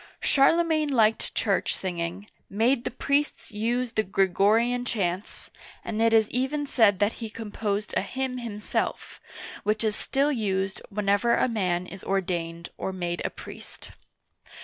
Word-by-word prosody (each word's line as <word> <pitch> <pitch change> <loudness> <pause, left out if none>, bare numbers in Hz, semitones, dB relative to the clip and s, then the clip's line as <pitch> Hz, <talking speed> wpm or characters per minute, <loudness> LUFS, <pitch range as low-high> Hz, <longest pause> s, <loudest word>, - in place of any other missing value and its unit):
Charlemagne 310 +2 +3
liked 225 -5 +2
church 200 -3 +1
singing, 175 +1 -4 0.2
made 235 +5 +2
the - - 0
priests 280 +4 -1
use 235 +3 -1
the 215 - +1
Gregorian 215 +5 +2
chants, 195 -5 -3 0.3
and 220 - -2
it 230 0 +4
is 220 -1 +5
even 265 +4 0
said 220 -8 +4
that 205 +3 +2
he 225 - -4
composed 210 -2 -3
a - - +3
hymn 255 +5 -3
himself, 215 -3 -3 0.4
which 215 +1 0
is 215 -1 +1
still 280 +2 +1
used 195 -6 -1
whenever 205 +3 +2
a - - +2
man 180 -6 0
is 195 +1 -10
ordained 170 -3 -2
or - - -2
made 175 -2 -3
a - - 0
priest. - - -11
215 Hz, 145 wpm, -26 LUFS, 195-245 Hz, 0.4 s, is